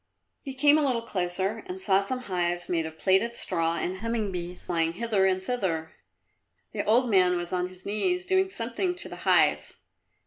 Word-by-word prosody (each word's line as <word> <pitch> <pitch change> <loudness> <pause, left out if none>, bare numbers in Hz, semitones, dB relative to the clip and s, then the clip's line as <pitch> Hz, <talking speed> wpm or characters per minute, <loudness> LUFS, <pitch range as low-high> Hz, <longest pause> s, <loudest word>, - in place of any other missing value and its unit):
He 270 -2 -7
came 295 +3 +5
a - - +1
little 255 -5 0
closer 190 +1 -2
and 185 +1 -6
saw 190 0 +3
some 250 +6 -3
hives 175 -4 -2
made 165 -2 0
of 160 0 -11
plaited 195 +7 +2
straw 165 -5 -1
and 185 +1 -3
humming 225 -2 -2
bees 180 0 -6
flying 165 -1 0
hither 210 -1 +1
and 185 0 0
thither. 175 -9 -2 0.8
The - - -2
old 240 +4 +3
man 185 -4 +4
was 175 0 -4
on 180 0 -1
his 185 0 -15
knees, 360 - 0
doing 380 0 +2
something 355 +6 -2
to 350 - -3
the - - -8
hives. - - +3
190 Hz, 185 wpm, -27 LUFS, 180-235 Hz, 0.8 s, came